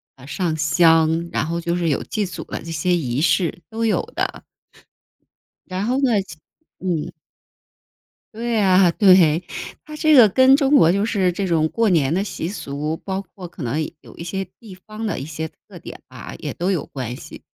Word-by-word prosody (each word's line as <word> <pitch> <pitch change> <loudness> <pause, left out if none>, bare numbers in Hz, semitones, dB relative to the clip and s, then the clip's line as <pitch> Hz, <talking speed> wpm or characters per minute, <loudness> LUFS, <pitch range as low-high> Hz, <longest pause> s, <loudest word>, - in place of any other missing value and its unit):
呃， 135 0 -15
上 160 +1 -2
香， 165 +1 +3
然 - - -1
后 170 +1 -2
就 170 0 -1
是 175 -1 -1
有 140 - 0
祭 215 -2 -2
祖 185 - -7
的 - - -6
这 165 - -8
些 175 +3 +1
仪 135 -4 -1
式， 175 +1 +1
都 225 +1 -2
有 220 - +2
的。 - - -3 1.2
然 185 +2 -3
后 250 +3 0
呢， 235 -7 +3
其 190 - -11 0.4
嗯。 175 -5 -2 1.2
对 235 +2 -3
呀， 190 -4 +4
对。 180 -4 +5 0.4
它 305 - -10
这 310 0 +3
个 245 -7 +8
跟 260 +6 +6
中 280 0 +3
国 165 - +6
就 200 +3 +1
是 195 -5 +1
这 190 +2 -3
种 160 -2 +2
过 230 +3 +1
年 155 -5 +2
的 190 +3 +1
习 180 -5 -5
俗， 150 -4 -4
包 190 +2 -4
括 185 -2 -11
可 170 -2 -9
能 140 +6 -1 0.2
有 - - -15
一 - - -7
些 190 +3 -3
地 210 -5 -12
方 215 +1 -5
的 - - -2
一 135 - -5
些 160 +1 -5 0.2
特 - - -12
点 - - -10
啊， - - -9
也 - - -5
都 180 +2 -2
有 180 -7 -1
关 125 -3 -6
系。 - - -11
180 Hz, 210 characters per minute, -21 LUFS, 160-205 Hz, 1.2 s, 个